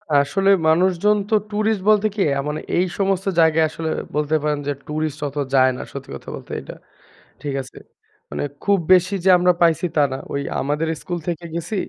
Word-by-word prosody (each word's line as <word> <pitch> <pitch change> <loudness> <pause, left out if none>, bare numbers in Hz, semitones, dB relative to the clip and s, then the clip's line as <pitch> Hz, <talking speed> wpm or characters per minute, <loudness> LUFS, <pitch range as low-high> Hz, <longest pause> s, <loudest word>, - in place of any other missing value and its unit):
আসলে 145 +8 +2 0.2
মানুষজন 185 +5 +3
তো 220 - +3 0.2
ট্যুরিস্ট 215 -1 0
বলতে 215 0 +4
কি 210 - -1
অ্যা 140 0 0
মানে 150 - -3 0.2
এই 180 - +3
সমস্ত 195 -1 0
জায়গায় 160 -1 +4
আসলে 160 +1 -4 0.3
বলতে 150 +1 +1
পারেন 150 -1 0
যে - - +1
ট্যুরিস্ট 155 0 -3
অত 140 +1 -8 0.2
যায় 130 -1 +5
না - - -6
সত্যি - - -8
কথা - - -10
বলতে - - -11
এটা - - -10 0.7
ঠিক 145 -2 -3
আছে? 130 - -13 0.5
মানে - - -3 0.2
খুব 200 -1 +3 0.2
বেশি 185 +2 +3
যে - - +5
আমরা 180 0 +4
পাইছি 170 +1 +3
তা 150 - +4
না 130 - -3 0.2
ওই 140 - -1 0.2
আমাদের 150 +4 -1
স্কুল 175 -2 -4
থেকে 170 0 -3
গেছি 170 +5 -4
165 Hz, 190 wpm, -21 LUFS, 150-190 Hz, 0.7 s, যায়